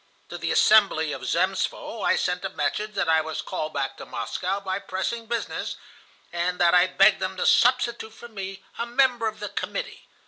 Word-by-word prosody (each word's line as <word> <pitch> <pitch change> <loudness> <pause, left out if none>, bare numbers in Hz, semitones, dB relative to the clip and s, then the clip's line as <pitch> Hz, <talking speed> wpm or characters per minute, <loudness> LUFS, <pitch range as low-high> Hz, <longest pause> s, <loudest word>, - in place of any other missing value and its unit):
To - - -6
the - - -2
assembly 195 -8 +4
of 130 -3 -6
Zemstvo 185 - -1
I - - +3
sent 180 0 -1
a - - -2
message 210 +9 -2
that 175 - 0
I 160 0 +4
was 160 0 -5
called 155 0 -4
back 135 -1 -3
to - - -9
Moscow 180 - -3
by 190 -1 -3
pressing 225 +5 -4
business, 235 0 -3 0.6
and 175 +1 -1
that 175 -1 +4
I 180 +1 +6
begged 195 +2 +4
them 190 0 -3
to - - -1
substitute 235 -2 +3
for 230 +2 -12
me 195 -3 -7 0.2
a 235 - -2
member 245 -2 +2
of 215 0 -5
the 210 - -5
Committee. - - -5
195 Hz, 195 wpm, -25 LUFS, 175-220 Hz, 0.6 s, I